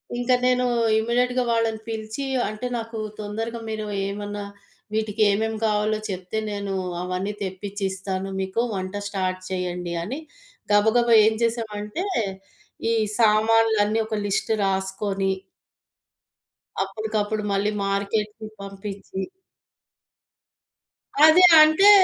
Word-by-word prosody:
ఇంక 245 +1 -1
నేనూ 250 0 +3 0.3
ఇమీడియేట్‌గా 245 +2 +1
వాళ్ళని 225 -1 +1
పిలిచీ, 220 +4 -4 0.2
అంటే 215 +3 -6
నాకు 230 0 -6 0.2
తొందరగా 225 +3 -4
మీరు 215 -1 -3 0.2
ఏమన్నా, 205 +1 -5 0.5
వీటికేమేం 215 0 +1
కావాలో 215 0 +1
చెప్తే, 185 +2 -4
నేనూ 200 -1 -3 0.3
అవన్నీ 185 +3 -3
తెప్పిచ్చిస్తాను 195 0 -4
మీకు, 190 +4 -1
వంట 185 0 -4
స్టార్ట్ 185 -2 -2
చేయండి 180 -2 -3
అని, 250 - -4 0.5
గబగబా 225 +3 +4
ఏం 220 - +4
జేసామంటే, 225 - -2 0.9
ఈ - - +3 0.3
సామాన్లన్నీ 220 -1 +4
ఒక 220 - -2
లిస్ట్ 200 +3 -1
రాసుకొని... 195 0 -1 1.5
అప్పుడికప్పుడు 215 +1 -2
మళ్ళీ 200 +1 +1
మార్కెట్టుకి 210 +2 -2
పంపిచ్చి. 195 0 -6 2.0
అదే 320 +4 +7 0.2
అంటే 315 +7 +7
210 Hz, 95 wpm, -24 LUFS, 195-225 Hz, 2.0 s, అదే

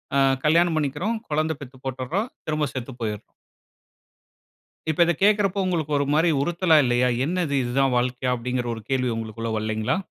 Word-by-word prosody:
அ - - +4 0.3
கல்யாணம் 165 +1 +4
பண்ணிக்கிறோம். 155 +10 -1
குழந்தை 155 +1 0
பெத்து 130 -1 -10
போட்டுட்றோம். 135 - -2 0.2
திரும்ப 155 -1 0
செத்து 130 +1 -5
போயிர்றோம். 105 -1 -4 1.6
இப்ப 160 - -1
இத 170 - +3
கேக்குறப்ப 205 -2 +3
உங்களுக்கு, 160 -5 -1
ஒரு 140 - +1
மாரி 165 +3 +3
உறுத்தலா 170 0 +3
இல்லையா? 120 +1 +2 0.2
என்னது, 170 -3 -1
இது 120 0 -3
தான் 135 -2 +2
வாழ்க்கையா? 125 +1 0
அப்பிடீங்கிற 125 0 -2
ஒரு 110 - -8
கேள்வி 125 -2 +1
உங்களுக்குள்ள 115 0 -4
வல்லைங்களா? 110 - -1
140 Hz, 155 wpm, -24 LUFS, 125-170 Hz, 1.6 s, அ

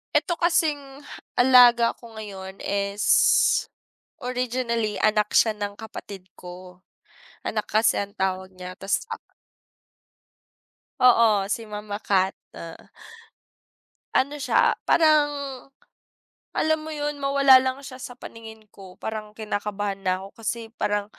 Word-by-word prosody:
Ito 345 -2 +1
kasing 295 -5 0 0.3
alaga 245 -2 +6
ko 230 -2 -14
ngayon 195 -3 -9
is, 200 +1 -2 1.2
originally 245 -3 -2
anak 210 -1 +2
siya 220 - +5
ng 205 -1 -5
kapatid 200 -4 -10
ko. 180 0 -11 0.6
Anak - - -3
kasi 220 +1 +2
ang 200 0 -5
tawag 190 0 -2
niya, 180 0 -8
ta's 195 +1 -1
ak 455 - -4 1.8
Oo, 230 -5 +5
si 215 +3 -2
mama 210 0 -6
cat, 190 -1 +1 0.2
ah. 165 -1 -10 1.3
Ano 285 +3 +1
siya, - - +2
parang, 310 -2 +5 1.3
alam 315 0 +2
mo 315 - -8
'yun 295 -1 -3
mawala 275 -1 +6
lang 260 0 -2
siya 255 -2 -9
sa 245 - -8
paningin 220 -2 -11
ko 190 -2 -13
parang 215 -1 -5
kinakabahan 205 -2 -3
na 185 -1 0
ako 195 - -15
kasi 225 +1 -3
parang 205 -1 0
220 Hz, 120 wpm, -24 LUFS, 200-255 Hz, 1.8 s, alaga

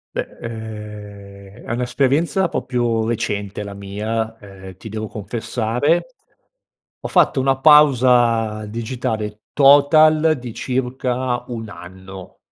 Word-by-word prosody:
Beh, - - -2
ehm, 105 -3 -9
è - - -5
un'esperienza 135 +9 0
proprio 115 -5 -1
recente 105 -3 -3
la 100 -1 -8
mia, 110 +3 -4
ehm, 95 -2 -12
ti 110 +3 -10
devo 110 +1 -5
confessare 115 - -1 0.9
ho - - -4
fatto 135 - +3
una 135 0 +1
pausa 125 -7 +4
digitale 110 -2 -4
total 155 +2 +5
di 120 -2 -8
circa 125 -1 -2
1 115 -3 -6
anno. 95 -1 -11
115 Hz, 105 wpm, -20 LUFS, 105-130 Hz, 0.9 s, total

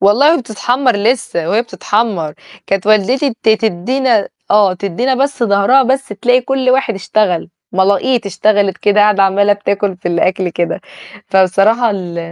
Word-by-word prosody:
والله 255 +11 +4
وبتتحمّر 245 +1 -1
لسّه 205 -6 -1
وهي 220 +5 +1
بتتحمّر. 205 -9 -2 0.3
كانت 195 0 -2
والدتي 235 +6 +2
ت - - 0
تدّينا 220 +2 +1 0.2
آه، 205 -3 +3
تدّينا 200 +8 -2
بس 275 -1 -1
ضهرها 200 +5 +3
بس 265 +2 -1
تلاقي 240 +5 +1
كل 260 0 -1
واحد 255 -3 +1
اشتغل، 195 -2 -1 0.2
ملاقيط 200 +5 +1
اشتغلت 200 0 0
كده، 205 0 +2
قاعدة 205 -1 +3
عَمّالة 200 +1 +2
بتاكل 200 -1 -2
في 175 - -5
الأكل 180 +2 0
كده. 170 0 -3 0.5
فبصراحة 195 +5 +2
ال 180 -4 -5
205 Hz, 140 wpm, -14 LUFS, 195-245 Hz, 0.5 s, والله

